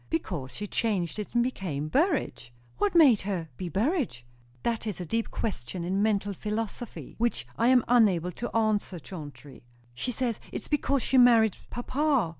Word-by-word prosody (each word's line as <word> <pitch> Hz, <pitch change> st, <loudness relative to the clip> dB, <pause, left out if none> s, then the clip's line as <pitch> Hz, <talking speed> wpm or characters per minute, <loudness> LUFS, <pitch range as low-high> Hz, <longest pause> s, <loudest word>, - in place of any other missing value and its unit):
"Because 160 Hz, -5 st, -3 dB
she 205 Hz, -, -4 dB
changed 205 Hz, -4 st, -1 dB
it 210 Hz, -, -6 dB
and 240 Hz, -, +4 dB
became 175 Hz, -, -3 dB
Burrage." 260 Hz, -, 0 dB, 0.3 s
"What 205 Hz, -, +1 dB
made 280 Hz, -10 st, +7 dB
her 185 Hz, -5 st, -3 dB
be 180 Hz, +4 st, -5 dB
Burrage?" 215 Hz, -, -1 dB, 0.4 s
"That 230 Hz, -1 st, -1 dB
is 205 Hz, -5 st, -3 dB
a 180 Hz, -, -4 dB
deep 225 Hz, +7 st, -1 dB
question 175 Hz, -, -4 dB
in 190 Hz, +3 st, 0 dB
mental 205 Hz, -1 st, +1 dB
philosophy, 215 Hz, +4 st, -5 dB
which 230 Hz, -, 0 dB
I 230 Hz, -, +2 dB
am 250 Hz, -2 st, +5 dB
unable 195 Hz, -8 st, +4 dB
to 240 Hz, +7 st, -5 dB
answer, 215 Hz, -4 st, +1 dB
Chauncey." 145 Hz, -, -10 dB, 0.3 s
"She 245 Hz, -, -3 dB
says, 240 Hz, -2 st, -1 dB
it's -, -, -5 dB
because 280 Hz, -3 st, +1 dB
she 265 Hz, -, +3 dB
married 230 Hz, -4 st, +6 dB
papa." 265 Hz, -, +1 dB
210 Hz, 165 wpm, -28 LUFS, 175-240 Hz, 0.4 s, made